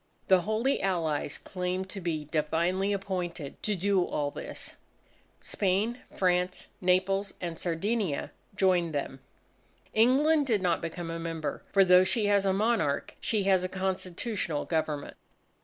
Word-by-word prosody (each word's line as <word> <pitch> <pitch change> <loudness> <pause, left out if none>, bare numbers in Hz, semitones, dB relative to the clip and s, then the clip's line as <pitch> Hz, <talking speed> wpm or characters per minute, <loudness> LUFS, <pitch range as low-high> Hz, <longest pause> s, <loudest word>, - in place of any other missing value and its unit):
The 190 -1 +6
Holy 220 +8 0
Allies 165 -6 -1
claimed 185 0 -3
to 195 - -6
be 160 -3 -2
divinely 170 +6 0
appointed 180 -6 -4
to 210 - 0
do 195 0 +2
all 145 -4 -2
this. - - -7 0.7
Spain, 205 +5 0
France, 180 -1 0 0.2
Naples, 190 +2 +1
and 170 -2 -5
Sardinia 180 -1 -1 0.2
joined 180 -5 +2
them. 135 -1 -3 0.7
England 280 +6 +4
did 215 -6 +1
not 175 -2 +1
become 165 0 -5
a 165 - -4
member 165 -3 -4
for 195 -1 +5
though 180 0 +7
she 210 +3 +1
has 200 -1 +3
a - - +4
monarch, 195 -8 +1
she 215 -3 +1
has 190 -2 +3
a 185 - -2
Constitutional 185 -2 -2
Government. 155 -3 -2
185 Hz, 140 wpm, -29 LUFS, 165-200 Hz, 0.7 s, though